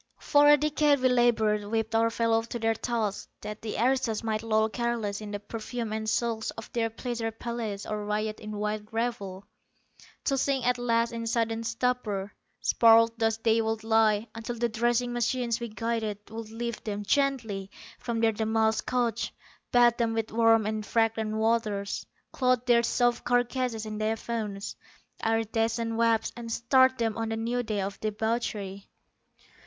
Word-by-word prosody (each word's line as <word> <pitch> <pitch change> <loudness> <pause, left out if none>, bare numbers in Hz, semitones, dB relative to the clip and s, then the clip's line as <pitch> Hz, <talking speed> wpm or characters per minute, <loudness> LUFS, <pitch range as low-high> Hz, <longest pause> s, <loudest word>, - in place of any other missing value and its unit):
For 290 0 +4
a 295 0 +8
decade 300 0 +2
we 255 - +4
labored, 225 -4 +3
whipped 225 +1 -2
our 225 0 +3
fellows 230 0 +1
to 240 - -4
their 225 -1 +1
tasks, 225 -3 -2
that 210 +1 -7
the 220 - -4
aristos 240 -2 +1
might 215 -1 -1
loll 220 -1 +2
careless 225 -3 -2
in 210 - -6
the 205 0 -4
perfume 225 +2 -5
and 220 0 -2
silks 225 -1 0
of 225 - -9
their 230 -1 +1
pleasure 230 0 -3
palaces, 225 -3 -5
or 210 -1 -3
riot 215 +1 -2
in 215 0 -7
wild 210 0 -3
revel, 215 -5 -3 0.8
to 275 -1 +1
sink 270 -2 0
at 250 0 +2
last 230 -1 +1
in 230 -1 -4
sodden 230 0 0
stupor. 230 -4 -1 0.3
Sprawled 230 0 +5
thus 225 -1 +2
they 225 0 +2
would 220 0 -2
lie, 220 -1 +3
until 225 +1 -5
the 235 0 0
dressing 240 +2 +1
machines 240 0 0
we 235 -1 -4
guided 220 -1 -2
would 225 -1 -6
lift 235 0 -5
them 205 -1 -3
gently 225 -5 0 0.3
from 235 -2 -2
their 225 -1 +4
damasked 220 0 +1
couches, 235 -2 0 0.4
bathe 240 -1 +5
them 230 -2 +1
with 225 -1 -2
warm 225 -1 +4
and 215 0 -2
fragrant 225 -1 0
waters, 220 -3 0 0.2
clothe 255 -2 +1
their 240 -1 +5
soft 240 0 +1
carcasses 245 -2 0
in 215 0 -5
diaphanous, 215 -2 -3 0.5
iridescent 225 +1 0
webs, 230 -1 +2
and 235 -1 -7
start 260 +3 +4
them 225 -3 0
on 225 0 -2
a 225 - -1
new 235 +2 -1
day 215 -4 -2
of 195 +1 -4
debauchery. 215 -2 -3
225 Hz, 165 wpm, -28 LUFS, 215-235 Hz, 0.8 s, a